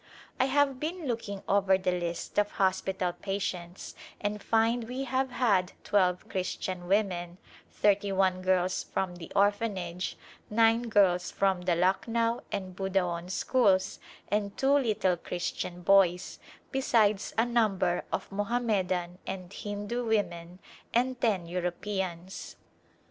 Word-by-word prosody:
I 260 - +4
have 275 -1 +2
been 330 +3 -4
looking 225 -6 -3
over 195 -1 +4
the 185 -1 0
list 175 +1 -2
of 205 0 0
hos 190 -1 +2
pital 185 -2 -2
patients 185 -3 -4 0.3
and 205 0 -2
find 230 +2 +2
we 250 +3 -4
have 265 0 0
had 210 -7 +1
twelve 180 -3 +2
Christian 185 -1 -3
women, 180 -3 0 0.3
thirty 205 -1 +2
one 190 -1 +2
girls 185 0 +1
from 180 -2 -3
the 165 - -10
Orphanage, 195 -3 0 0.3
nine 225 +2 +3
girls 185 -4 +3
from 195 -2 +1
the 180 -1 +1
Lucknow 230 +6 +1
and 185 -2 -4
Budaon 180 -3 -1
schools 190 -2 +2 0.3
and 205 -1 -1
two 270 +1 +3
little 215 -9 +2
Christian 175 +1 -4
boys, 185 -2 +3 0.3
besides 220 -6 +2
a 225 - +4
number 215 -7 +1
of - - -2
Moham 205 +5 -1
medan 180 -4 -1
and 185 0 -6
Hindu 205 +4 -4
women 180 -6 -1 0.4
and 250 +1 +1
ten 200 -7 +1
Europeans. 180 +1 -4
195 Hz, 130 wpm, -29 LUFS, 180-225 Hz, 0.4 s, I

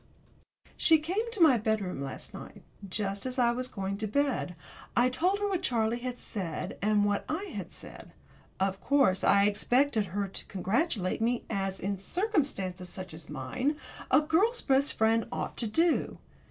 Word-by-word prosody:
She 320 - +6
came 375 +10 -2
to 445 - -5
my 265 -7 +6
bedroom 210 -8 -1
last 135 -1 -5
night, - - -10 0.3
just 200 +3 -2
as 255 +1 -4
I 240 -2 +4
was 250 +1 -2
going 200 -3 -4
to 215 - -1
bed. 265 -7 0 0.4
I 245 +1 +4
told 360 +10 +1
her 410 0 -1
what 375 -3 -1
Charlie 235 -7 +1
had 250 0 -4
said, 180 -10 -5
and 210 0 +3
what 205 0 +1
I 385 +6 -3
had - - -5
said. - - -11 0.5
Of 195 0 0
course 270 -10 +3
I 200 0 +5
expected 230 +3 +2
her 200 +2 -2
to 195 - -7
congratulate 200 - 0
me 235 +1 +1
as, 195 -2 -2
in 195 0 -2
circumstances 200 - -1
such 185 -2 -7
as 160 -1 -10
mine, 250 - -1 0.3
a - - +6
girl's 375 +11 +2
best 275 +1 +3
friend 225 +1 +2
ought - - -3
to 230 - -1
do. 325 +9 +1
225 Hz, 170 wpm, -30 LUFS, 195-290 Hz, 0.5 s, She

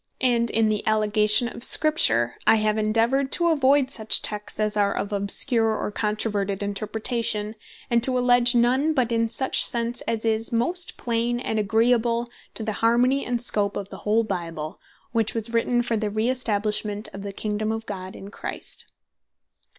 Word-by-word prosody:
And 235 -2 +2
in 225 0 +1
the 210 -1 -1
allegation 215 +1 +4
of 235 - -9
Scripture, 120 - +3
I - - +7
have 215 -1 +1
endeavoured 230 +5 0
to 340 -1 +3
avoid 280 -3 +2
such 220 -4 +3
Texts 210 0 -3
as 215 0 -1
are 200 -1 +1
of 205 - -4
obscure, 220 +3 +2
or - - -4
controverted 205 -2 -2
Interpretation; 215 +1 -1 0.3
and 235 -1 +1
to 255 -1 +2
alledge 245 0 +3
none, 260 +6 +2
but 245 -4 0
is 230 -1 0
such 265 - +4
sense 235 0 0
as 225 -1 -2
is 225 0 -1
most 340 +10 0
plain, 240 0 -2
and 220 -3 -2
agreeable 235 +2 +1 0.2
to 225 - -5
the 215 0 -3
harmony 245 +4 +2
and 240 -1 -3
scope 205 -4 0
of 200 -1 -6
the - - -9
whole 220 +2 +1
Bible; 170 -5 -6 0.3
which 225 -2 -1
was 225 0 -1
written 240 +1 +1
for 235 - -2
the 215 -1 -2
re 215 +3 -1
establishment 210 -3 -2
of 195 - -8
the 200 0 -6
Kingdome 215 +2 -3
of 225 0 -5
God 190 -2 -7
in 200 +1 -11
Christ. - - -5
225 Hz, 175 wpm, -23 LUFS, 210-240 Hz, 0.3 s, I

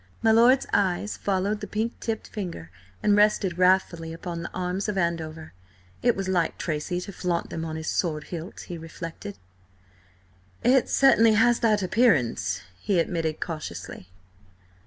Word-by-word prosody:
My 225 - +5
lord's 240 +4 +5
eyes 195 +1 +1
followed 200 +2 -1
the - - -5
pink 220 +2 -3
tipped 225 -1 -3
finger 170 - -6 0.3
and 205 - +4
rested 205 -4 +2
wrathfully 180 -3 +2
upon 170 0 -6
the 170 - -5
arms 185 +3 -2
of 205 - -2
Andover. 165 -3 -2 0.5
It 240 -1 +3
was 195 -1 -3
like 175 -3 0
Tracy 160 +3 -2
to 200 - -7
flaunt 175 -1 -2
them 165 - -4
on 160 -1 -4
his 160 0 -5
sword 155 -4 -1
hilt, 170 +4 -6
he 175 -3 -7
reflected. 165 +4 -8 1.3
"It 255 +1 +4
certainly 230 -5 +5
has 235 +2 +4
that 215 -4 +2
appearance," 190 - +2 0.2
he 195 - 0
admitted 165 -2 -1
cautiously. 95 - -6
180 Hz, 150 wpm, -26 LUFS, 165-210 Hz, 1.3 s, My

